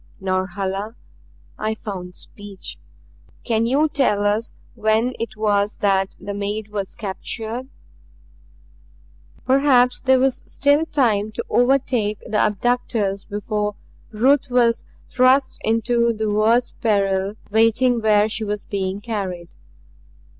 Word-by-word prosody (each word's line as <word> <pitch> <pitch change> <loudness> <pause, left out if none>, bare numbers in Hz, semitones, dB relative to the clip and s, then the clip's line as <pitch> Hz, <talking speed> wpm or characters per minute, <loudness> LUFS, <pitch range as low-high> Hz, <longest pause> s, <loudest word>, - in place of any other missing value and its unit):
"Norhala" 190 +3 -2 0.6
I 215 +1 -1
found 185 -4 -7
speech 205 -2 -9 0.6
"can 225 -1 +1
you 285 +5 +3
tell 245 -9 +1
us 210 +3 0 0.2
when 220 +2 +1
it 230 -1 -5
was 210 -1 +1
that 195 -1 +1
the 200 +1 -5
maid 205 +1 -3
was 200 -2 -4
captured?" 220 +4 -4 1.8
Perhaps 260 -2 +3
there 265 -1 +4
was 265 0 +1
still 285 +3 +2
time 220 -8 +1
to - - -4
overtake 245 -4 +2
the 210 - -2
abductors 210 -2 0
before 210 0 -2 0.3
Ruth 255 +6 +2
was 240 -2 +2 0.3
thrust 260 +2 +3
into 235 +1 +2
the 215 -1 -2
worse 225 +4 +2
peril 195 -2 +1 0.2
waiting 230 +2 +3
where 210 -1 +4
she 220 0 -4
was 210 -1 -3
being 195 0 -3
carried. 190 -6 -4
215 Hz, 115 wpm, -21 LUFS, 205-245 Hz, 1.8 s, there